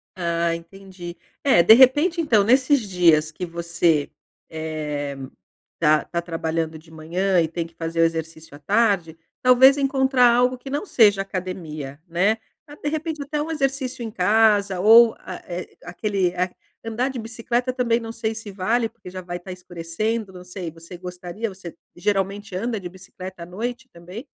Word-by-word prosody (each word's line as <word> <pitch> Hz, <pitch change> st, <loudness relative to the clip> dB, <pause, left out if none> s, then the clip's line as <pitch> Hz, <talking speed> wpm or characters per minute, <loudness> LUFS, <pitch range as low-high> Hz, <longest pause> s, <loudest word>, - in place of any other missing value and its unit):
Ah, 170 Hz, -1 st, 0 dB
entendi. 175 Hz, 0 st, -10 dB, 0.3 s
É, 265 Hz, -11 st, +5 dB
de 220 Hz, -, +9 dB
repente, 290 Hz, +8 st, +5 dB
então, 235 Hz, -11 st, +3 dB
nesses 260 Hz, +6 st, +4 dB
dias 170 Hz, -6 st, +3 dB
que 180 Hz, +3 st, -5 dB
você, 170 Hz, -3 st, 0 dB, 0.4 s
eh, 150 Hz, -3 st, -4 dB, 0.6 s
tá 155 Hz, -2 st, +4 dB
tá 170 Hz, -1 st, -3 dB
trabalhando 165 Hz, -1 st, -3 dB
de 160 Hz, +1 st, -18 dB
manhã 175 Hz, +4 st, 0 dB
e 160 Hz, -, +1 dB
tem 165 Hz, +1 st, -4 dB
que 165 Hz, -, -15 dB
fazer 165 Hz, 0 st, -2 dB
o -, -, +6 dB
exercício 160 Hz, -2 st, -3 dB
à 145 Hz, -, -13 dB
tarde, 195 Hz, -2 st, +1 dB, 0.2 s
talvez 255 Hz, +2 st, +6 dB
encontrar 265 Hz, -2 st, +3 dB
algo 250 Hz, +1 st, +2 dB
que 270 Hz, -, -10 dB
não 290 Hz, +9 st, -2 dB
seja 205 Hz, -, +4 dB
academia, 165 Hz, -7 st, -6 dB
né. 190 Hz, +6 st, +2 dB, 0.3 s
Ah, 290 Hz, -, -11 dB
de 295 Hz, -, -3 dB
repente 315 Hz, -1 st, -3 dB
até 295 Hz, +1 st, -3 dB
um 310 Hz, -, -4 dB
exercício 270 Hz, -4 st, -2 dB
em 225 Hz, -, -5 dB
casa 205 Hz, -1 st, +3 dB
ou, 225 Hz, +4 st, +7 dB
a -, -, -8 dB
eh, 175 Hz, 0 st, -6 dB
aquele 185 Hz, 0 st, -1 dB, 0.5 s
andar 240 Hz, +4 st, -1 dB
de 260 Hz, -, -5 dB
bicicleta 235 Hz, +2 st, -2 dB
também 240 Hz, -2 st, +1 dB
não 225 Hz, -1 st, -7 dB
sei 225 Hz, -1 st, -3 dB
se 220 Hz, -2 st, -8 dB
vale, 225 Hz, +5 st, 0 dB
porque 180 Hz, -, -13 dB
já 185 Hz, 0 st, -7 dB
vai 175 Hz, 0 st, -5 dB
estar 180 Hz, +2 st, -10 dB
escurecendo, 185 Hz, +5 st, -4 dB
não 180 Hz, -, -10 dB
sei, 180 Hz, -2 st, -6 dB
você 165 Hz, +2 st, -12 dB
gostaria, 180 Hz, +4 st, -6 dB
você 185 Hz, -3 st, -10 dB, 0.2 s
geralmente 200 Hz, +1 st, -2 dB
anda 225 Hz, +3 st, -2 dB
de 180 Hz, -, -6 dB
bicicleta 185 Hz, -1 st, -10 dB
à -, -, -7 dB
noite 245 Hz, +8 st, -5 dB
também? 180 Hz, -, -10 dB
190 Hz, 170 wpm, -23 LUFS, 170-235 Hz, 0.6 s, de